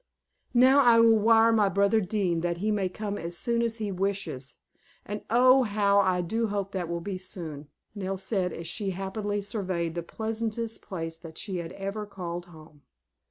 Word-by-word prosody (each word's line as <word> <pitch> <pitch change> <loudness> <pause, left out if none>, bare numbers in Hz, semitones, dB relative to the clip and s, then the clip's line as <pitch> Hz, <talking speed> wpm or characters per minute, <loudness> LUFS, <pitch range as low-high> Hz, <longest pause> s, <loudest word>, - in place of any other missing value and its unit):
"Now 260 +3 +6
I 235 -3 +6
will 225 -1 +6
wire 225 +1 +5
my 215 -3 +3
brother 200 +3 +3
Dean 185 -4 0
that 170 0 -1
he 210 +4 0
may 200 -3 0
come 205 +2 -4
as 170 +1 -4
soon 235 +2 0
as 230 -1 0
he 210 -3 -3
wishes; 190 -8 -3 0.5
and 205 +1 -5
oh, 255 +3 +6
how 200 -3 +2
I 185 -2 +2
do 225 +6 -1
hope 200 -1 -3
that 180 -4 -3
will 170 0 -3
be 190 +1 -4
soon," 160 -6 -6 0.3
Nell 195 -2 -3
said 190 -1 0
as 165 - -7
she 200 +3 -2
happily 205 +1 -2
surveyed 185 -5 -2
the 170 - -3
pleasantest 225 +4 -4
place 165 -3 -5
that 165 -1 -11
she 195 -4 -4
had 170 -1 -5
ever 200 +2 -5
called 175 -3 -6
home. 155 -3 -16
200 Hz, 185 wpm, -27 LUFS, 175-220 Hz, 0.5 s, Now